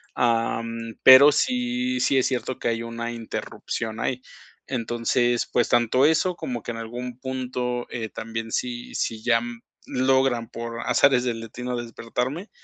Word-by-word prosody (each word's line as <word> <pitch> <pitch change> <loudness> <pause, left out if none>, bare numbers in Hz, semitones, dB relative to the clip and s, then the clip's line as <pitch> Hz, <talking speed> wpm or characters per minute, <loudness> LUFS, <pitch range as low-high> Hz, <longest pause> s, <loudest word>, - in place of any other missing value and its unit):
am, 115 -1 -1
pero 135 +3 +10
sí, 250 - 0
sí 135 - +2
es 130 - +3
cierto 130 -1 -2
que - - -1
hay 115 0 -1
una 115 0 -4
interrupción 115 -1 -5
ahí. 130 -1 -2 0.4
Entonces, 120 0 0
pues 120 - +2
tanto 120 +3 +3
eso 165 +3 +2
como 120 -7 -5
que - - -4
en 115 - -6
algún 120 +2 -6
punto 125 -2 -3
eh, 110 -3 -4
también 115 0 -5
si 120 0 -3
si 110 -1 -2
ya 115 -1 +3
mm, 120 -1 -7 0.2
logran, 130 -3 +1
por 115 0 -6
azares 130 -3 +3
del 120 -2 -2
destino, 125 +2 -5
despertarme, 125 - -4
120 Hz, 150 wpm, -24 LUFS, 115-130 Hz, 0.4 s, pero